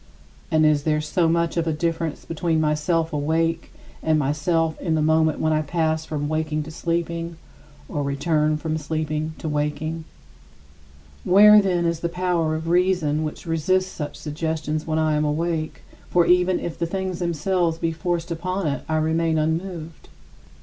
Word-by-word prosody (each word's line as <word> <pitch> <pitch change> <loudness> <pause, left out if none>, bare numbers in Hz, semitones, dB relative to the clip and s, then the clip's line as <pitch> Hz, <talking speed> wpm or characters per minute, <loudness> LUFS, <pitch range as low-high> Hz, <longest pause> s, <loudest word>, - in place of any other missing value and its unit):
And 155 0 +3
is 150 -1 +4
there 150 +1 +1
so 165 +2 +1
much 170 0 +1
of 165 -1 0
a - - +2
difference 165 0 -2
between 165 0 0
myself 155 +2 0
awake 165 +3 0 0.3
and 160 -1 +2
myself 155 +3 0
in 165 -3 0
the 155 - +1
moment 160 0 +3
when 155 0 +1
I 155 - +2
pass 160 0 -1
from 145 -2 -3
waking 155 0 -1
to 155 - -9
sleeping, 170 0 -2 0.5
or 145 - -3
return 150 +2 +1
from 160 0 -2
sleeping 155 +1 -3
to - - -6
waking? 150 +2 -2 1.2
Where, 210 +3 +8
then, 180 -3 0
is 170 -1 0
the 170 - -2
power 170 -3 0
of 160 +1 -5
reason 175 -4 +2
which 155 - -5
resists 185 +3 +1
such 150 -2 -5
suggestions 155 0 -3
when 155 0 0
I 155 -1 +2
am 150 0 +1
awake 155 +1 -2 0.3
for 175 -1 +3
even 180 +1 +3
if 170 - -5
the 170 - 0
things 190 0 -3
themselves 170 0 0
be 165 0 -1
forced 170 +1 -2
upon 185 +3 -2
it 140 -2 -1
I 160 - +1
remain 160 +1 +1
unmoved? 160 +1 -3
160 Hz, 165 wpm, -23 LUFS, 155-170 Hz, 1.2 s, Where